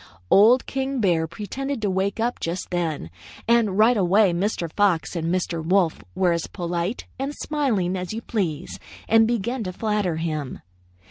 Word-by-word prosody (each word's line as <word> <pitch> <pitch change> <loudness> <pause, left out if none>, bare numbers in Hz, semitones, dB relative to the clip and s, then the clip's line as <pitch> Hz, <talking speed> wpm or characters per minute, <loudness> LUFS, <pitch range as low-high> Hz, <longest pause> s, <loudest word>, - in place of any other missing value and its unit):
"Old 230 +6 +6
King 270 0 -2
Bear 170 -6 +2
pretended 255 - -4
to 205 - +1
wake 190 +3 -1
up 240 +2 -1
just 170 +3 -4
then, 160 - -2 0.4
and 230 -5 +3
right 225 +3 +5
away 195 -1 +3
Mr. 180 -1 -1
Fox 190 -5 +1
and 165 -1 -2
Mr. 175 -3 -1
Wolf 175 -1 +1
were 185 -1 +2
as 170 -1 -1
polite 175 +4 -3
and 275 +2 -3
smiling 230 -12 -1
as 180 -1 -4
you 225 +1 -5
please 180 -7 -3 0.3
and 225 0 +5
began 235 +1 -1
to 185 - -4
flatter 210 -3 -1
him. 155 -4 -4
190 Hz, 160 wpm, -23 LUFS, 170-225 Hz, 0.4 s, Old